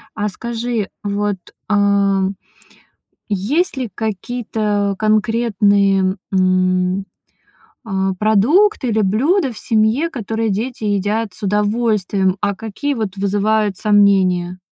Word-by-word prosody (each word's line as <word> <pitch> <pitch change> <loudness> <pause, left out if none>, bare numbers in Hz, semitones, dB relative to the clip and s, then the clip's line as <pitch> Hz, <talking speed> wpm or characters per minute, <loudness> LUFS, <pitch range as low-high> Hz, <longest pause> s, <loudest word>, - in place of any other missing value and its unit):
А 210 -1 -1
скажи, 235 0 -3 0.2
вот, 205 -1 -1 0.3
а, 200 -2 +2 1.0
есть 225 - 0
ли 255 -4 -3
какие-то 215 -2 -2
конкретные, 205 -3 +2 0.2
м, 185 0 +1 0.8
а, 190 -1 0
продукты 260 - +3
или 220 -1 +1
блюда 260 - +1
в 220 - -10
семье, 225 +9 +1
которые 225 -4 -2
дети 225 +3 -3
едят 205 +2 0
с - - -13
удовольствием, 205 -2 +1
а 200 -1 0
какие 225 +7 -3
вот 215 -5 -4
вызывают 205 +1 0
сомнения? 190 -4 +2
210 Hz, 100 wpm, -18 LUFS, 195-225 Hz, 1.0 s, продукты